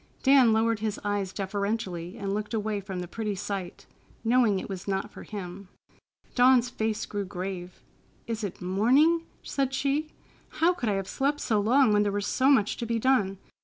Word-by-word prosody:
Dan 265 -4 +6
lowered 225 0 +2
his 215 -1 -2
eyes 205 -2 -1
deferentially 195 -2 -3
and 200 -2 -3
looked 210 +2 -3
away 210 -1 -1
from 190 -2 -5
the 180 - -5
pretty 210 +2 -3
sight, 190 -2 -5 0.4
knowing 230 -3 +3
it - - -5
was 190 -1 -7
not 195 -1 -2
for - - -11
him. 190 -2 -8 0.6
Dawn's 250 -1 +5
face 220 -2 -2
grew 205 -1 -3
grave. 180 -1 -6 0.4
"Is 230 -2 -4
it 195 -3 -5
morning?" 270 - +3 0.2
said 270 -1 -1
she. 285 +3 0 0.5
"How 340 +3 +4
could 250 -11 -2
I - - +2
have 195 -1 -3
slept 285 +2 0
so 215 -3 +1
long 235 +2 +4
when 205 - +4
there 205 -1 +1
was 205 0 -2
so 260 +5 +2
much 225 -8 +3
to 235 - -4
be 230 0 0
done! 215 -6 +2
210 Hz, 185 wpm, -27 LUFS, 195-245 Hz, 0.6 s, Dan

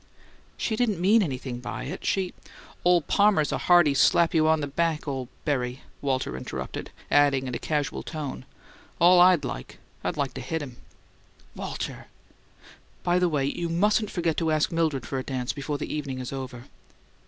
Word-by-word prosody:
"She 220 - -1
didn't 215 -6 0
mean 205 +6 +5
anything 130 -7 -3
by 125 - -5
it. 175 +8 -6
She 190 -2 0 0.3
" - - -21
"Ole 175 -1 +5
Palmer's 200 -6 +3
a - - -1
hearty, 175 -5 +5
slap 165 +6 +4
you 155 -1 +4
on 160 0 +4
the 145 - -1
back 160 +2 -1
ole 130 -3 -3 0.2
berry," 130 -4 -1 0.2
Walter 130 - -1
interrupted; 65 - -5 0.2
adding 140 -2 +4
in 125 - -4
a - - -2
casual 150 -3 -1
tone, 150 -4 -5 0.6
"All 175 +1 +7
I'd 180 -3 +6
like, 60 - -6 0.3
I'd - - -2
like 140 -3 -1
to 130 - -6
hit 160 +6 -2
him." 130 -4 -9 0.8
"Walter! - - -5 1.0
By 175 +1 +2
the 180 -1 +3
way, 145 -4 0
you 170 +4 -2
mustn't 210 +5 +2
forget 170 -3 -1
to 165 -2 +1
ask 155 -1 +2
Mildred 160 -7 0
for 135 - -3
a - - -4
dance 130 -2 -3
before 145 +1 -3
the 145 - -5
evening 140 -3 -3
is 130 +1 -5
over." 130 -3 -6
150 Hz, 180 wpm, -26 LUFS, 135-175 Hz, 1.0 s, All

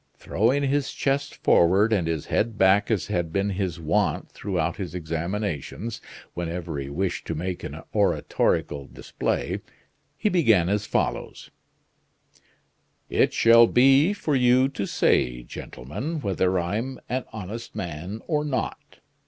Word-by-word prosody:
Throwing 130 +7 +1
his 140 0 0
chest 140 +1 -1
forward, 95 +6 +4
and 90 -6 +1
his 80 -3 -2
head 115 -1 0
back 95 +1 +4
as 100 -8 +1
had 85 -5 -2
been 100 +3 0
his 95 -3 -2
wont 80 -1 0
throughout 85 -4 -2
his 90 -3 -5
examinations, 90 - -4 0.3
whenever 85 -3 -4
he 70 0 -5
wished 90 +6 -2
to 80 - -2
make 90 +3 -4
an - - -6
oratorical 70 -1 +1
display, - - -3 0.6
he 215 - 0
began 115 - +3
as 105 +1 0
follows: - - -2 1.6
"It - - +3
shall 115 0 +6
be 135 - +5
for 160 -8 -1
you 125 +1 +4
to 100 -8 -4
say, - - +1
gentlemen, 100 - -6
whether 95 -3 +1
I'm 110 +9 -2
an 130 +1 -2
honest 110 +2 -7
man 90 +2 -5
or 150 -3 0
not. 145 -4 -4
100 Hz, 135 wpm, -25 LUFS, 85-125 Hz, 1.6 s, shall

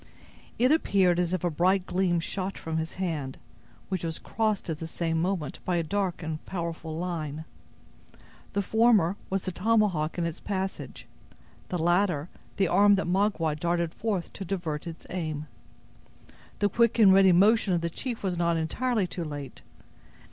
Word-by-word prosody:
It 250 +3 +4
appeared 190 - +3
as 175 -1 0
if 185 -2 -1
a 175 - +1
bright 185 +4 +2
gleam 180 -2 +1
shot 190 +3 -3
from 160 0 -4
his 160 0 -3
hand, 155 -8 -3 0.5
which 185 -3 -2
was 165 -1 -2
crossed 215 -4 -1
at 160 -2 -3
the 165 - -5
same 165 0 -1
moment 180 -5 -2
by 180 - 0
a 170 - +1
dark 185 0 -2
and 155 -1 -4
powerful 165 -3 -4
line. 160 -3 -4 1.1
The 200 - 0
former 220 -4 +4
was 195 0 -1
the 185 - -2
tomahawk 185 -5 +1
in 170 - 0
its 165 -1 -4
passage; 190 -1 -4 0.6
the 180 - -1
latter 175 -2 +1 0.3
the 195 -2 +3
arm 200 +4 +5
that 195 - -1
Magua 180 -4 +1
darted 170 0 0
forward 205 -6 -2
to 195 - -6
divert 170 -5 -3
its 165 -1 -8
aim. 155 -4 -3 1.1
The 205 - +2
quick 235 +2 +2
and 205 -4 +7
ready 190 -1 +6
motion 200 +1 +4
of 170 - 0
the 170 - -1
chief 240 +4 -5
was 180 -3 -1
not 170 -1 +2
entirely 220 +6 0
too 175 0 -5
late. 145 -3 -7
180 Hz, 170 wpm, -27 LUFS, 165-195 Hz, 1.1 s, and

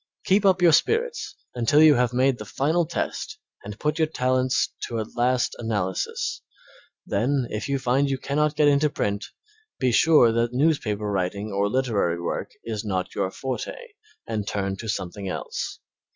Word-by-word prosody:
Keep 200 +2 +3
up 185 -1 +3
your 170 - +7
spirits 465 - +1 0.2
until 120 +4 +3
you 155 -1 +8
have 125 -2 +2
made 130 0 +2
the - - -5
final 155 - 0
test 170 - -3 0.3
and 105 +1 -8
put 150 +2 -1
your 160 - +3
talents 130 -3 +1
to 115 - -3
a 110 - -2
last 125 +1 +1
analysis, 100 -5 -2 0.6
then 125 +6 0
if 105 +5 -4
you 140 - +1
find 135 +2 +1
you 135 - 0
cannot 150 +3 0
get 150 0 +4
into 145 +1 +4
print 100 -6 -2 0.5
be 130 -2 +1
sure 150 -2 +5
that 115 +1 0
newspaper 125 -7 +1
writing 100 +1 -2
or 100 +1 +1
literary 105 -9 0
work 85 - -3
is 110 -2 -4
not 95 -4 -2
your 95 - -1
forte, 130 +5 -5 0.5
and 105 -3 -3
turn 95 -1 -2
to 110 - -8
something 95 +1 -4
else. - - -4
125 Hz, 165 wpm, -24 LUFS, 105-145 Hz, 0.6 s, you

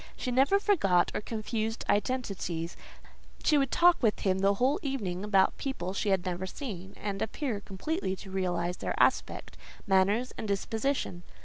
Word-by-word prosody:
She 250 - -3
never 275 +11 +4
forgot, 195 - +3
or - - -2
confused 220 +1 -3
identities: 195 -8 -1 0.7
she 300 -2 +4
would 275 -2 +1
talk 350 +4 +5
with 220 -4 +2
him 190 -1 +1
the 200 +1 +3
whole 255 +7 +2
evening 205 -10 -3
about 200 -2 +3
people 230 -10 -3
she 205 +1 -1
had 190 -2 +1
never 185 +1 -3
seen, 195 -6 -7
and 200 -1 -4
appear 230 -1 -2
completely 200 - -3
to 190 0 -11
realise 180 -2 -1
their - - -3
aspect, - - +1 0.3
manners, 200 +5 +2
and 220 - -3
dispositions. 215 -1 -1
205 Hz, 155 wpm, -30 LUFS, 190-255 Hz, 0.7 s, talk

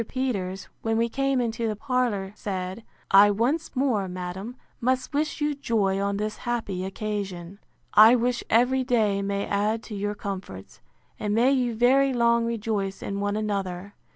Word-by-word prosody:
Peters, 200 -8 -3
when 225 0 0
we 230 +1 +2
came 275 +1 0
into 230 -1 -1
the 215 - -1
parlour, 230 -6 -1
said, 190 +1 -4 0.3
I 200 +1 +8
once 255 +11 0
more, 250 -7 +1
madam, 185 +5 -6 0.2
must 255 +3 0
wish 305 +3 -1
you 295 0 +1
joy 215 -8 0
on 200 0 -1
this 215 +1 -3
happy 225 -6 -3
occasion. 195 -2 -5 0.3
I 220 +3 +8
wish 245 0 0
every 255 +3 +3
day 220 -6 +1
may 200 0 -2
add 210 +2 0
to 215 - -7
your 205 +1 -2
comforts; 185 - -7 0.4
and 210 0 -1
may 245 +4 +4
you 250 -4 +1
very 265 +4 +4
long 235 -1 +3
rejoice 210 -4 -2
in 200 0 -3
one 205 0 -1
another! 200 -2 -3
215 Hz, 160 wpm, -26 LUFS, 200-245 Hz, 0.4 s, I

